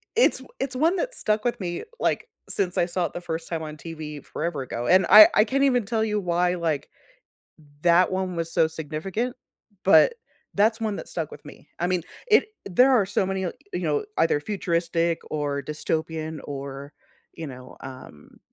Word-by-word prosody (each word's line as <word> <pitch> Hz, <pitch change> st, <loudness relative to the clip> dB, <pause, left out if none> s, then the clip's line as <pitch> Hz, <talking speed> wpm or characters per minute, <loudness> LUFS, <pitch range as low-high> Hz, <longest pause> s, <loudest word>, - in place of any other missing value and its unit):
it's, 470 Hz, -, +4 dB, 0.2 s
it's 270 Hz, -1 st, -3 dB
one 320 Hz, +7 st, +3 dB
that -, -, -2 dB
stuck 215 Hz, +1 st, 0 dB
with 240 Hz, -, 0 dB
me, 175 Hz, -3 st, -4 dB, 0.2 s
like, -, -, 0 dB, 0.2 s
since 185 Hz, -3 st, -1 dB
I -, -, +4 dB
saw 175 Hz, 0 st, -1 dB
it -, -, -5 dB
the 175 Hz, -, -5 dB
first 165 Hz, -1 st, -4 dB
time 165 Hz, -2 st, -3 dB
on 155 Hz, 0 st, -7 dB
TV 155 Hz, -2 st, -7 dB
forever 155 Hz, -3 st, -3 dB
ago, 120 Hz, -2 st, -4 dB
and 185 Hz, 0 st, +5 dB
I 215 Hz, 0 st, +11 dB
I 215 Hz, -, +6 dB
can't 275 Hz, +5 st, +1 dB
even 250 Hz, -5 st, +3 dB
tell 220 Hz, +1 st, 0 dB
you 210 Hz, -1 st, 0 dB
why, 180 Hz, -1 st, +1 dB
like 160 Hz, -5 st, -2 dB, 0.9 s
that 175 Hz, +2 st, +4 dB
one 185 Hz, -1 st, -2 dB
was 165 Hz, 0 st, -3 dB
so 160 Hz, -, +4 dB
significant, 165 Hz, -, -4 dB, 0.5 s
but 470 Hz, -, +6 dB, 0.4 s
that's 220 Hz, +3 st, +3 dB
one 215 Hz, -2 st, -1 dB
that -, -, -8 dB
stuck 160 Hz, -3 st, -4 dB
with 145 Hz, -, -12 dB
me. 145 Hz, 0 st, -13 dB
I 175 Hz, -, 0 dB
mean, 180 Hz, -1 st, 0 dB, 0.3 s
i -, -, +8 dB, 0.2 s
there 250 Hz, +9 st, +5 dB
are 230 Hz, -6 st, +5 dB
so 200 Hz, 0 st, +1 dB
many, 190 Hz, 0 st, -2 dB
you 180 Hz, -, -2 dB, 0.3 s
know, 435 Hz, -1 st, 0 dB
either 155 Hz, -3 st, +3 dB
futuristic 170 Hz, -3 st, 0 dB
or 145 Hz, -2 st, -2 dB
dystopian 155 Hz, +2 st, -3 dB
or, 140 Hz, 0 st, -7 dB, 0.4 s
you 165 Hz, -, -6 dB
know, 130 Hz, -2 st, -10 dB
um 130 Hz, -, -11 dB
175 Hz, 185 wpm, -25 LUFS, 155-210 Hz, 0.9 s, I